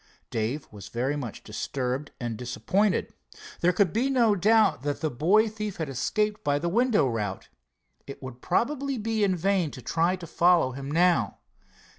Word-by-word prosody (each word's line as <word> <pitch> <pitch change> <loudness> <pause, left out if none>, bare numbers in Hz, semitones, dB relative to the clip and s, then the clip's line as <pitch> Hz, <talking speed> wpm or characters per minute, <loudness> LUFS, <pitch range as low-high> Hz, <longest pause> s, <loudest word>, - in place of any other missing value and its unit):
Dave 115 +7 -2
was 100 -2 -10
very 125 +7 -1
much 125 -7 -6
disturbed 125 +5 -3
and 120 -3 -3
disappointed. 125 - 0 0.5
There 175 - +3
could 180 0 +2
be 245 +5 +1
no 240 -5 +4
doubt 210 - +3
that 145 +1 -2
the 155 -2 -1
boy 190 - +3
thief 210 -2 -5
had 160 -3 -3
escaped 210 - -1
by 145 0 +2
the 170 +4 -1
window 230 - +3
route. 105 -5 -3 0.6
It 140 - -8
would 125 -1 -8
probably 275 +1 0
be 220 -1 -1
in 190 -2 +2
vain 185 -1 +1
to 130 - -10
try 170 +8 +1
to 180 -2 -9
follow 170 -4 +3
him 135 +2 -7
now. 165 - +2
165 Hz, 170 wpm, -27 LUFS, 130-210 Hz, 0.6 s, no